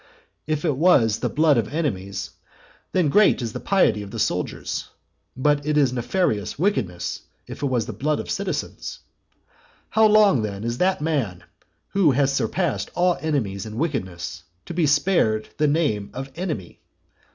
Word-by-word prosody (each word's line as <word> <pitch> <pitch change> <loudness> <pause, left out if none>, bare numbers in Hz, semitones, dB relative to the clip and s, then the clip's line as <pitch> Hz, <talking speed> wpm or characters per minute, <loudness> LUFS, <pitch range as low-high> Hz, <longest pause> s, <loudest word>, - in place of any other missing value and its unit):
If 155 +1 -1
it 150 -5 +1
was 125 - +4
the - - -1
blood 150 -4 +3
of 115 - -3
enemies, 100 - -3 0.6
then 175 -5 +2
great 210 +7 +5
is 115 -4 -4
the - - -4
piety 190 - +2
of 100 - -8
the - - -7
soldiers; - - -2 0.5
but 145 +2 +2
it 150 +1 0
is 135 -4 +3
nefarious 120 - -1
wickedness 130 - -1 0.2
if - - -9
it 145 - +1
was 125 -4 0
the 110 - -6
blood 150 +8 -1
of - - -5
citizens. 200 -2 -4 0.9
How 220 0 +5
long, 210 - +5
then, 100 -1 -4
is 115 +1 -3
that 185 -3 +2
man, 135 - -1 0.5
who 185 -8 +3
has 135 +1 +2
surpassed 140 - -1
all 180 0 +2
enemies 110 -11 -2
in 110 +1 -7
wickedness, 95 - -3 0.2
to - - -6
be 165 -2 +2
spared 145 - +2
the 150 - +4
name 145 -10 0
of 135 +1 -6
enemy? 160 - -5
145 Hz, 165 wpm, -23 LUFS, 110-165 Hz, 0.9 s, great